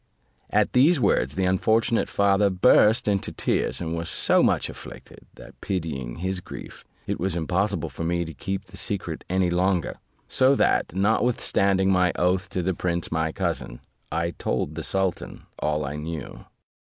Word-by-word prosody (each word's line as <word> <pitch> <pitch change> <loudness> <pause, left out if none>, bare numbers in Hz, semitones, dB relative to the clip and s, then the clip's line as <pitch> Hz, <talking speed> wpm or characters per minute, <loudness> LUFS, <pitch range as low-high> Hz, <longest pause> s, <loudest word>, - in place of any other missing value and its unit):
At - - +1
these 140 +6 +5
words, 65 - +1
the 95 0 0
unfortunate 110 +5 +2
father 100 0 +3
burst 105 +3 +4
into 100 -2 0
tears, - - -1
and 85 -1 -3
was 85 0 -4
so - - +3
much - - +2
afflicted, - - -12
that - - -14
pitying 80 -10 -3
his 95 +2 -2
grief, - - -10 0.2
it - - -3
was 90 -1 -1
impossible 90 +1 -1
for - - -6
me 85 +1 0
to 80 - -8
keep 95 +2 -4
the 95 0 -14
secret 90 -5 -4
any 90 -1 +1
longer; 90 0 0 0.3
so 130 +2 +3
that, 90 - +1
notwithstanding 100 -2 +2
my 90 -1 +3
oath 90 +1 +1
to 90 - -2
the 95 +2 0
prince 85 -1 -2
my 80 -1 0
cousin, - - -3 0.3
I 85 +2 -1
told 80 - -2
the 80 - -5
sultan 95 +2 -2 0.2
all 75 0 0
that 70 - -4
I - - -5
knew. 80 +1 -7
90 Hz, 165 wpm, -25 LUFS, 85-100 Hz, 0.3 s, these